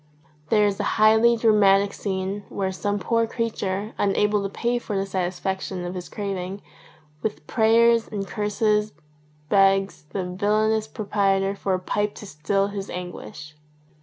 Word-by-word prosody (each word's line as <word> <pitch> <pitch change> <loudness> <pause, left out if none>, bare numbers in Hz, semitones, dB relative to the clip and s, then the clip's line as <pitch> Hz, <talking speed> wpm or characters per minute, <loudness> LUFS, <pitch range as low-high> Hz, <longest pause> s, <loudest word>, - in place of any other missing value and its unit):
There 210 -1 +4
is 200 -1 0
a - - 0
highly 220 +2 +5
dramatic 200 -3 +4
scene 195 0 -3
where 190 -1 -2
some 205 +2 -2
poor 230 +4 +1
creature, 215 -3 -3
unable 210 +1 +2
to 195 - -3
pay 240 +4 -1
for 210 -4 -4
the 195 - 0
satisfaction 190 0 -3
of 175 - -4
his 180 -1 -7
craving, 195 -1 -5 0.6
with 220 - -4
prayers 230 0 +4
and 200 -2 -4
curses 210 +1 0 0.6
begs 195 -4 +3
the 190 - -3
villainous 215 +4 +1
proprietor 195 -2 0
for 195 -1 -1
a - - -3
pipe 205 +3 -2
to - - -9
still 195 +5 -1
his 200 -1 -6
anguish. 150 -5 -8
200 Hz, 145 wpm, -24 LUFS, 190-215 Hz, 0.6 s, highly